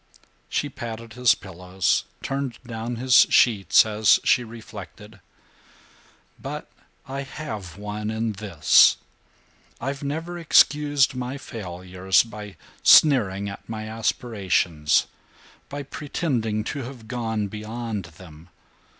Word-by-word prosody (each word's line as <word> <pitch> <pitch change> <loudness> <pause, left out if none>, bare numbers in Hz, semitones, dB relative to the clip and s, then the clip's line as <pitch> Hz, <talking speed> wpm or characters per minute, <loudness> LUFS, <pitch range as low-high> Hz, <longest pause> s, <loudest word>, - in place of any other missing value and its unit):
She 145 - -1
patted 115 -3 -8
his 125 -2 +4
pillows, 90 -2 -1 0.2
turned 135 -3 -3
down 115 0 -5
his 125 +1 +5
sheets, 110 -4 +5
as 110 0 +3
she 125 - +3
reflected: 110 -2 -11 1.2
"But - - -7 0.4
I 135 +1 -4
have 110 - -7
won 105 +1 -5
in 110 0 -1
this: 95 -6 +4 0.8
I've 140 +3 -4
never 165 +5 -4
excused 145 -4 +4
my 125 +1 -4
failures 95 -5 -1
by 105 -3 -10 0.2
sneering 100 -10 +5
at 100 +2 -9
my 110 -1 -5
aspirations, 100 - 0 0.6
by 145 0 -5
pretending 130 -7 -2
to 140 +6 -4
have 120 -3 -9
gone 110 -3 -2
beyond 110 -1 -5
them. 85 0 -15
110 Hz, 105 wpm, -24 LUFS, 100-130 Hz, 1.2 s, his